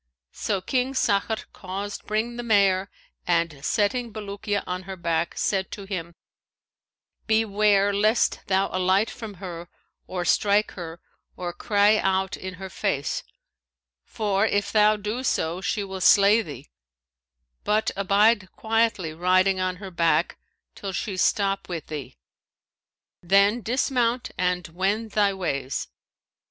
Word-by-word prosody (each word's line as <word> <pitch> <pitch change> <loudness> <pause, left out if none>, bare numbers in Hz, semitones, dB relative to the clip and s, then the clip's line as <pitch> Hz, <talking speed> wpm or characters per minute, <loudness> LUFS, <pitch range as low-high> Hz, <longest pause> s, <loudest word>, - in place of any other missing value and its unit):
So 200 -3 -2
King 255 +6 -1
Sakhr 220 -2 +1
caused 200 +2 -6
bring 220 +3 -1
the - - -3
mare 200 -4 +3 0.4
and, 165 -5 0
setting 225 +6 0
Bulukiya 205 -1 -3
on 180 0 -3
her 190 - -4
back, 170 -1 -1
said 190 -2 0
to 200 - -7
him, 170 -4 -5 1.1
'Beware 210 -2 +3
lest 215 +3 +2
thou 195 0 +2
alight 185 +3 +2
from 220 -4 -8
her 175 -2 -8 0.4
or 180 -1 -3
strike 205 +4 +3
her 170 -2 -8 0.4
or 175 -1 -4
cry 205 +3 +3
out 190 -1 0
in 185 0 -7
her 190 +1 -7
face; 145 -5 -2 0.8
for 200 - -1
if 205 -2 +1
thou 215 0 +4
do 210 +4 -3
so 170 -7 0
she 205 +1 -1
will 190 -1 -6
slay 205 +4 +6
thee; 145 - -10 0.9
but 215 +1 +1
abide 200 0 +3
quietly 220 -7 0
riding 185 +3 +2
on 185 0 -1
her 190 0 -9
back 170 -1 +1 0.3
till 195 -1 -6
she 195 +1 -3
stop 195 +1 +1
with 170 -3 -4
thee; 145 - -7 1.0
then 200 +6 +4
dismount 245 0 0
and 180 -1 -1
wend 200 +6 -1
thy 205 -1 +3
ways.' 140 -9 -3
195 Hz, 130 wpm, -25 LUFS, 180-215 Hz, 1.1 s, slay